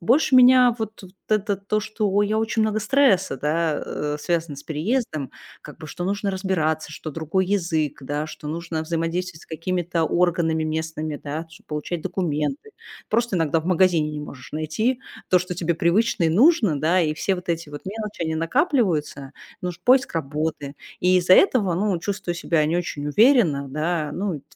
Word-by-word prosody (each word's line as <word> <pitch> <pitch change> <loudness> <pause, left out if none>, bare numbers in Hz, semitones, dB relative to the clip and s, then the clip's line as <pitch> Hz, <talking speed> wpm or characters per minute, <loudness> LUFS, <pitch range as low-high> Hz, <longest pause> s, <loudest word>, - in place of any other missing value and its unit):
Больше 260 - +3
меня 250 -1 +7
вот 220 -2 -5
вот 185 -1 -13 0.2
это 210 -2 +1
то, 200 +2 -1
что 210 -2 0
я 210 +1 0
очень 225 0 0
много 215 0 0
стресса, 210 - +3
да, 155 +2 0
э, 150 0 -3
связано 165 -3 -2
с 140 - -9
переездом. 160 - -2 0.3
Как 150 - -12
бы, 155 - -9
что 175 +4 -6
нужно 200 +1 -1
разбираться, 160 -5 -1
что 155 - -7
другой 165 +5 -1
язык, 165 -7 -1
да. 145 +3 -3
Что 155 -1 -8
нужно 165 0 -3
взаимодействовать 165 +1 -3
с - - -17
какими-то 175 +1 -2
органами 165 -1 +1
местными, 155 -1 -3
да, 150 +3 -5
чтоб 165 - -17
получать 155 +2 -4
документы. 175 - -2 0.4
Просто 230 -3 +1
иногда 165 -1 +1
в 160 - -12
магазине 175 -4 +3
не 150 0 -5
можешь 140 -3 -10
найти 185 - -1 0.3
то, 180 - +6
что 180 0 -4
тебе 170 -1 -1
привычно 175 +3 +2
и - - +4
нужно, 215 - +4
да. 170 +5 +2
И 155 -2 0
все 190 +4 0
вот 180 - -10
эти 165 -2 -2
вот 145 0 -8
мелочи, 210 -2 -5
они 160 -1 -1
накапливаются. 165 - 0 0.3
Ну 180 - -1
ж 175 - -11
поиск 260 -4 +3
работы. 150 -1 -3 0.3
И 180 +1 +4
из-за 185 +1 +5
этого, 225 - +4
ну, 195 0 0
чувствую 195 -2 -3
себя 165 -2 +1
не 165 +3 0
очень 150 -4 -3
уверенно, 170 - +4
да. 155 +2 -2
Ну, 180 -7 -3
170 Hz, 180 wpm, -23 LUFS, 155-205 Hz, 0.4 s, меня